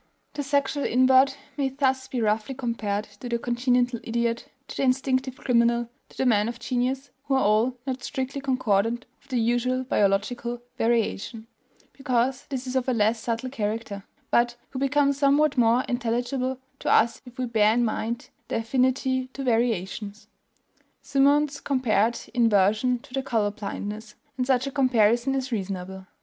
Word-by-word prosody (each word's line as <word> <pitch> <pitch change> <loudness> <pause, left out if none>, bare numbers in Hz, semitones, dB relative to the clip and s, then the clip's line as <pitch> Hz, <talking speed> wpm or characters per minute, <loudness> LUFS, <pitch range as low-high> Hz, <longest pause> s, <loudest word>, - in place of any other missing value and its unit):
The 290 - -3
sexual 280 0 0
invert 260 +2 +4 0.2
may 275 -2 +1
thus 265 -1 0
be 255 -2 -3
roughly 215 +4 0
compared 220 -5 -2 0.2
to 250 - -6
the 235 - 0
congenital 245 0 +1
idiot, 235 0 -1 0.2
to - - -7
the - - -1
instinctive 260 0 +1
criminal, 235 -1 +2 0.2
to - - -19
the 265 - 0
man 215 -3 +3
of 240 - -6
genius, 255 +2 -2
who 275 -2 +1
are 265 - +3
all 220 +5 +2
not 260 -1 -4
strictly 270 0 -3
concordant 240 -3 0 0.2
with 280 - -27
the 255 -2 0
usual 245 +3 +1
biological 235 +2 0
variation 225 -1 -1 0.5
(because 260 -1 -1
this 265 -2 -4
is 255 0 -5
of 260 0 +1
a - - +2
less 220 0 +2
subtle 230 +3 -3
character), 210 -4 -3 0.3
but 240 0 +3 0.2
who 260 - -4
become 280 +1 +2
somewhat 285 +1 +3
more 240 0 +3
intelligible 245 +2 -1 0.2
to - - -1
us 230 - +3
if 245 -1 -14
we 255 - -1
bear 215 -3 +3
in 240 0 +2
mind 230 +2 -3 0.2
their - - -1
affinity 260 +2 +1
to 275 - -5
variations. 215 -3 -1 0.8
Symonds 285 +1 +2
compared 235 -4 +1
inversion 225 +1 +3
to 250 +3 -5
color 225 -6 0
blindness; 210 +1 -6 0.2
and 255 -1 -2
such 260 -1 +2
a 275 - -3
comparison 245 -1 +3
is 265 -1 -2
reasonable. 190 -2 -4
245 Hz, 160 wpm, -25 LUFS, 225-265 Hz, 0.8 s, invert